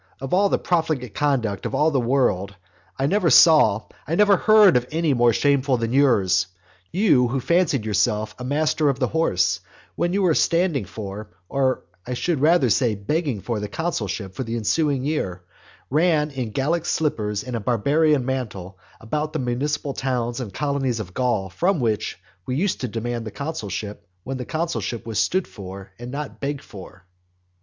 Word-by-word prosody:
Of 135 +3 -5
all 200 +2 +4
the - - +2
profligate 155 - -1
conduct 120 -9 0
of - - -3
all 155 +2 +3
the 140 - +1
world, 115 -6 +1 0.4
I 135 - 0
never 185 +3 +2
saw, 125 - +6 0.2
I 160 - 0
never 205 +1 +5
heard 215 -2 +6
of 125 0 +1
any 160 -2 +1
more 120 -1 +4
shameful 135 +3 +2
than 115 0 -2
yours. 100 -10 +3 0.4
You 170 - +3
who 135 +3 -1
fancied 150 -5 +1
yourself 105 0 0
a - - -6
master 150 +2 +1
of 135 - 0
the 130 -3 0
horse, 95 - +1 0.4
when 175 - 0
you 195 +1 +1
were 175 -3 +4
standing 165 - +1
for, 100 +2 -7 0.2
or 135 -2 0 0.2
I 125 +3 -4
should 155 +2 -1
rather 150 -6 +4
say 120 -3 +2
begging 130 - -2
for 115 0 -3
the 105 - -4
consulship 105 - -3
for 130 - -4
the 115 -1 -4
ensuing 135 +4 0
year, 95 - -2 0.5
ran 155 0 +2
in 130 -4 -4
Gallic 155 +9 -1
slippers 105 -10 -1
and 125 -1 -5
a - - -1
barbarian 140 +6 +2
mantle 105 -8 -4 0.2
about 150 +7 -3
the - - -1
municipal 140 +3 -2
towns 125 -3 -2
and 120 -6 -5
colonies 135 0 -1
of 90 -4 -7
Gaul 120 -6 0
from 175 - 0
which 110 -4 -1 0.3
we 125 - -1
used 185 +6 0
to 125 - -1
demand 115 +1 -3
the 110 - -5
consulship 105 - -5 0.2
when 135 +4 -4
the 125 - -5
consulship 160 -7 -3
was 110 -2 -2
stood 185 0 +1
for 95 -1 -10
and 120 +1 -7
not 145 +2 -6
begged 140 0 -3
for. 95 -3 -12
130 Hz, 180 wpm, -23 LUFS, 110-155 Hz, 0.5 s, saw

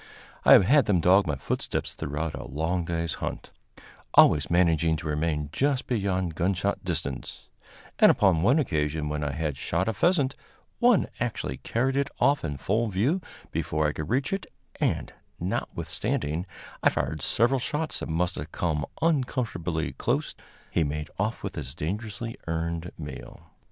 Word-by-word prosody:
I - - +8
have 95 - +8
had 140 +5 +5
them 100 -5 +3
dog 95 +3 +5
my 75 - 0
footsteps 65 - -2
throughout 75 +2 -3
a 70 - -6
long 80 +5 -1
day's 85 -1 -1
hunt, - - -4 0.6
always 75 - +6
managing 85 -2 +3
to 80 +1 -5
remain 75 -1 -1
just 135 - +1
beyond 95 -8 0
gunshot 95 +4 0
distance; - - -4 0.5
and - - +8
upon 95 -6 +4
one 120 - +4
occasion, 75 - 0
when 75 0 -2
I 75 - -1
had 75 -1 -2
shot 85 +7 -1
a 115 - +1
pheasant, 145 - +2 0.4
one 240 -4 +4
actually 115 - -2
carried 130 +3 -1
it 140 0 +1
off 140 0 +3
in 75 -4 -3
full 105 - 0
view 115 - +1 0.3
before 75 0 -1
I 75 - -1
could 75 0 -5
reach 135 +8 +1
it, 195 - -3 0.3
and, - - 0 0.3
notwithstanding 80 +6 -2 0.3
I - - +5
fired 80 -2 -2
several 120 - +2
shots 150 +5 -2
that - - -5
must 90 +3 0
have 75 +3 -6
come 75 -5 -1 0.2
uncomfortably 115 - 0
close, - - -1 0.4
he 85 - +2
made 75 +1 -3
off 110 +3 -1
with - - -3
his - - -6
dangerously 105 +6 -4
earned 85 +1 -2
meal. 75 -4 -9
85 Hz, 160 wpm, -27 LUFS, 75-115 Hz, 0.6 s, I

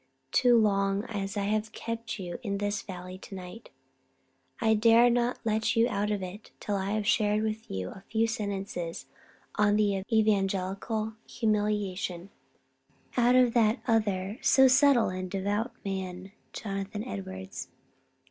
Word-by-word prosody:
Too 245 -1 +5
long 200 -2 +2
as 200 -3 -4
I 200 - 0
have 215 +1 -1
kept 230 0 -5
you 175 -2 -5
in 200 -5 -2
this 205 0 -1
valley 185 -1 -8
to 195 - -10
night, 185 +5 -9 0.9
I 220 -1 +3
dare 230 +2 +6
not 245 +1 +1
let 225 +1 +1
you 230 +1 +4
out 205 -2 -1
of 205 -2 -1
it 190 +4 -8
till 205 - -2
I 195 +1 -1
have 215 -1 -1
shared 210 0 +2
with 220 0 -3
you 95 -1 -3
a 195 - -11
few 225 0 +2
sentences 200 -6 -4 0.5
on 210 0 +4
evangelical 205 +1 0 0.2
humiliation 205 -5 -1 0.8
out 245 0 +4
of 250 -2 +5
that 225 0 +3
other 210 -1 0
so 265 0 +6
subtle 265 -2 +5
and 185 0 -4
devout 205 +5 -1
man, 190 -1 -4 0.2
Jonathan 195 0 -4
Edwards. 95 -1 -6
210 Hz, 140 wpm, -29 LUFS, 195-225 Hz, 0.9 s, dare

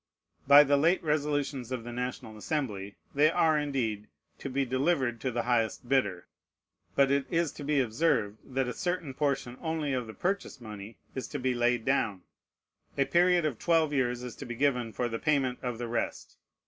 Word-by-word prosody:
By 140 +1 +10
the 145 0 +3
late 165 +6 +3
resolutions 145 -4 -1
of 125 -3 -3
the 120 - -7
National 125 -3 -4
Assembly, 105 -6 -3 0.2
they 150 +2 +5
are, 160 -1 +3
indeed, 125 -8 -1 0.3
to 135 - -5
be 135 +1 0
delivered 130 -2 0
to 130 - -1
the 120 -1 -1
highest 120 0 0
bidder. 100 -10 +1 0.7
But 140 -1 +4
it 140 -1 +1
is 170 -2 +1
to 145 - -9
be 145 0 +1
observed, 115 -4 +1
that 130 -1 -2
a 125 - -3
certain 175 -6 -2
portion 135 -3 -1
only 160 -4 -1
of 125 -3 -2
the 110 - -9
purchase 190 -6 -2
money 105 -1 -9 0.2
is 130 - -4
to 145 - -4
be 130 -1 0
laid 120 -1 +1
down. 110 -9 0 0.7
A 140 - +3
period 175 0 +3
of 135 -7 -2
twelve 160 -3 +2
years 125 -3 0
is 125 -2 -6
to 135 - -7
be 120 - -5
given 125 -3 +1
for 120 +2 -1
the 115 -1 -4
payment 140 -5 +1
of 125 -2 -3
the 120 0 -4
rest. 115 +1 -3
130 Hz, 190 wpm, -29 LUFS, 120-150 Hz, 0.7 s, By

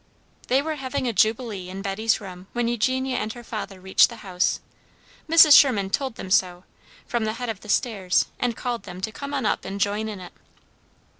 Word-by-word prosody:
They 265 +2 +2
were 310 0 -3
having 260 -1 -3
a 235 - -1
jubilee 215 -2 0
in 195 +1 -7
Betty's 215 +4 0
room 185 -2 -10
when 240 -1 0
Eugenia 255 +3 0
and 215 - -2
her 240 - -11
father 205 -4 -6
reached 190 +1 +4
the 235 - -9
house. 180 -1 0 0.7
Mrs. 320 -2 +8
Sherman 205 -9 +5
told 265 -1 -1
them 190 - -8
so, 180 -2 +2 0.4
from 240 -2 -2
the 215 - -1
head 245 +1 -5
of 220 -4 -4
the 210 - -13
stairs 200 -7 +1
and 240 -2 -1
called 240 -2 -3
them 180 -2 -9
to 220 - -3
come 280 +5 -7
on 275 -4 -2
up - - 0
and 195 +1 -6
join 205 +2 0
in 205 -3 -7
it. 180 - -11
220 Hz, 205 wpm, -24 LUFS, 195-250 Hz, 0.7 s, Mrs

